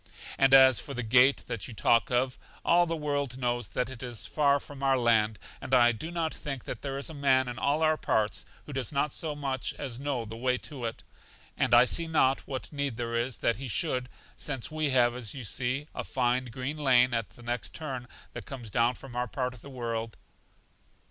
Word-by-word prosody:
And 135 0 +5
as 130 -2 +8
for 140 - -7
the 125 - -2
gate 125 +4 +5
that 115 -4 -3
you 120 - -9
talk 115 +3 +3
of, 125 +1 0 0.3
all 175 0 +4
the 165 - -1
world 145 -4 -2
knows 120 -3 -1
that 125 +5 -2
it 120 - -8
is 120 -4 -4
far 145 -2 +2
from 140 -1 -11
our 135 -1 +3
land, 110 -3 +3 0.2
and 130 - +1
I 120 -1 +6
do 120 +8 -6
not 165 -2 -2
think 135 -4 -5
that - - -5
there 135 -1 -4
is 140 - -2
a - - -8
man 135 -3 +3
in 125 0 -5
all 150 +3 +1
our 155 0 +3
parts 110 -6 0 0.2
who 145 - -8
does 130 -4 -2 0.2
so 155 0 -2
much 135 -3 -3
as 130 -4 -6
know 135 -4 -2
the 110 +1 -8
way 125 +2 0
to 130 -4 -6
it, 115 - -5 0.5
and - - +1
I 120 +1 +8
see 165 +6 +2
not 135 -4 +2
what 135 +2 -6
need 140 -5 -2
there 115 -1 -3
is 120 +1 0
that 115 - +3
he 135 +1 -6
should, 125 0 0 0.3
since 135 -1 -4
we 155 -1 0
have, 120 -2 +4
as 120 -2 -4
you 130 - -6
see, 130 +6 -2
a - - -4
fine 125 0 0
green 130 +5 -5
lane 125 -4 +4
at 115 -2 -1
the 120 - -16
next 120 -1 -4
turn 130 -6 -5 0.3
that - - -8
comes 120 -6 -7
down 120 +3 +2
from 130 -3 -11
our 125 0 -1
part 125 +1 -3
of 120 - -14
the 140 - -11
world. 115 -3 -4
130 Hz, 220 wpm, -29 LUFS, 120-140 Hz, 0.5 s, as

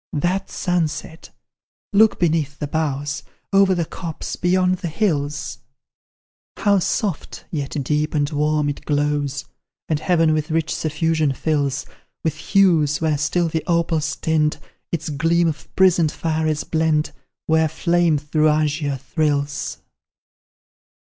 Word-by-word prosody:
That 175 +6 -1
sunset! 165 -2 -2 0.6
Look 215 +2 +5
beneath 155 -4 +1
the 150 - -3
boughs, 145 -1 -2 0.3
Over 195 -1 +5
the 170 -2 0
copse 165 -1 -6
beyond 185 +1 +2
the 175 - -4
hills; 150 -5 -1 1.0
How 200 -1 +3
soft, 185 -1 -2
yet 145 -2 -3
deep 150 +3 0
and 145 -1 +2
warm 150 0 +1
it 145 - -4
glows, 145 -1 0 0.4
And 155 -2 0
heaven 165 -2 +3
with 155 -1 -1
rich 160 0 0
suffusion 155 -1 0
fills; 140 -2 -1 0.4
With 160 - +1
hues 155 -4 +3
where 155 -3 0
still 170 +3 +1
the 160 -1 -2
opal's 165 -3 +1
tint, 155 -1 +1 0.3
Its 160 -2 -2
gleam 165 +4 +2
of 155 -2 -4
prisoned 175 -4 +4
fire 160 -1 -1
is 155 -1 0
blent, 160 -1 +1 0.3
Where 160 0 +3
flame 170 0 +2
through 150 +1 +1
azure 150 -2 0
thrills! 145 0 -1
155 Hz, 125 wpm, -21 LUFS, 150-170 Hz, 1.0 s, Look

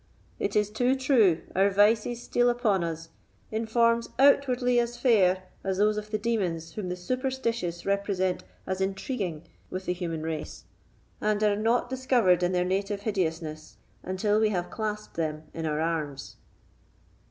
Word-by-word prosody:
It - - -2
is 210 0 +2
too 245 +4 +2
true, 230 - +3
our 195 +2 +4
vices 215 +4 +2
steal 245 0 +2
upon 225 -7 +1
us 165 0 -5 0.4
in 220 +1 -2
forms 230 0 +2
outwardly 255 -3 +4
as 240 0 -1
fair 195 -7 +3 0.2
as 190 -1 -1
those 210 +1 +3
of 210 0 -5
the 215 - 0
demons 185 -8 -1
whom 200 -4 -4
the 180 - -2
superstitious 230 -4 -2
represent 195 -2 0 0.2
as 190 0 -3
intriguing 190 - -3 0.3
with 185 0 -5
the 180 - 0
human 165 -3 -4
race, 160 -1 -5 0.6
and 210 0 +1
are 210 -1 +3
not 225 +4 +1
discovered 245 -8 +2
in 175 0 +1
their 180 -1 +1
native 195 +2 -1
hideousness 160 -6 -3 0.2
until 205 +3 0
we 220 -1 +3
have 180 -4 -2
clasped 215 -3 -4
them 155 -2 -2
in 165 -1 -3
our 150 0 -1
arms." 155 -4 -3
200 Hz, 155 wpm, -27 LUFS, 180-230 Hz, 0.6 s, our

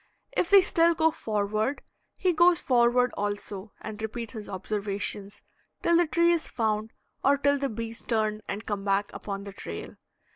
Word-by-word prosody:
If 365 -8 0
they 400 -1 +8
still 335 -1 +3
go 320 0 +3
forward, 215 0 -1 0.3
he 365 -2 +2
goes 345 +1 +5
forward 245 0 +3
also 205 0 -4
and 215 0 -7
repeats 225 +2 -4
his 215 -3 -7
observations 200 0 -4 0.4
till 340 - +4
the 345 0 +4
tree 340 +2 +3
is 335 -2 0
found 220 -1 -1 0.3
or 280 +1 +4
till 285 +1 +2
the 275 0 -1
bees 230 +1 -6
turn 215 -2 0
and 205 +3 -4
come 205 -2 -3
back 200 0 0
upon 200 -1 -5
the 200 -1 -8
trail. - - -7
220 Hz, 170 wpm, -27 LUFS, 205-285 Hz, 0.4 s, they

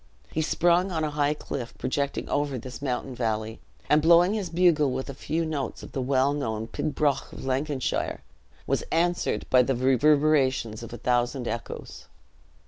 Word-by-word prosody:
He 160 - -1
sprung 175 +4 +2
on 160 -2 -1
a 150 - -1
high 145 0 +1
cliff 120 -4 -6
projecting 140 +2 -2
over 145 -2 -1
this 125 0 -8
mountain 130 -1 -2
valley, 110 -2 -2 0.3
and 150 - +4
blowing 170 +4 +5
his 205 -4 -2
bugle 165 -5 +3
with 130 +2 -3
a - - -8
few 160 +5 -2
notes 150 -4 -4
of - - -10
the 135 - -3
well 135 +2 +2
known 110 -6 -2
pibroch 140 +3 -1
of - - -9
Lanarkshire, 135 +1 -1 0.4
was - - 0
answered 175 +1 +1
by 130 - +7
the 130 +1 0
reverberations 130 -3 +2
of 115 - -8
a 120 - -6
thousand 120 +1 0
echoes. 115 - -6
140 Hz, 165 wpm, -26 LUFS, 125-155 Hz, 0.4 s, by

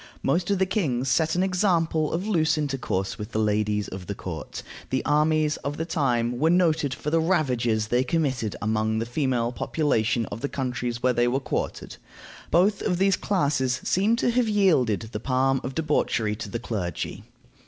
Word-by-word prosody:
Most 170 +7 +1
of 200 - +2
the 190 - +2
kings 135 - -1
set 160 +5 +2
an 180 - +2
example 170 -5 +1
of 175 +4 -2
loose 160 -6 +2
intercourse 135 -10 -2
with 105 - -7
the - - -1
ladies 105 -1 +1
of 95 -1 -8
the 100 - -4
court. 80 -6 -7 0.3
The 130 - -1
armies 150 0 +2
of 145 +1 -5
the 165 - -2
time 125 -7 0
were 160 - +3
noted 165 -5 +2
for 150 +2 -4
the 165 - +3
ravages 125 - +1
they 125 +1 +2
committed 130 - -1
among 110 +1 0
the 115 - -1
female 120 -2 0
population 115 -4 0
of 105 - -6
the 140 - -2
countries 125 -2 -3
where 125 0 +3
they 120 0 +2
were 130 +3 +1
quartered. 135 - -4 0.5
Both 195 +4 +3
of 180 - 0
these 195 +1 +3
classes 145 -12 0
seem 205 +5 +2
to 240 - +1
have 240 -1 +1
yielded 165 - +3
the - - -4
palm 135 0 +1
of 130 - -5
debauchery 135 -9 0
to 110 -2 -6
the 110 - -3
clergy. 100 -8 -4
135 Hz, 185 wpm, -25 LUFS, 115-165 Hz, 0.5 s, were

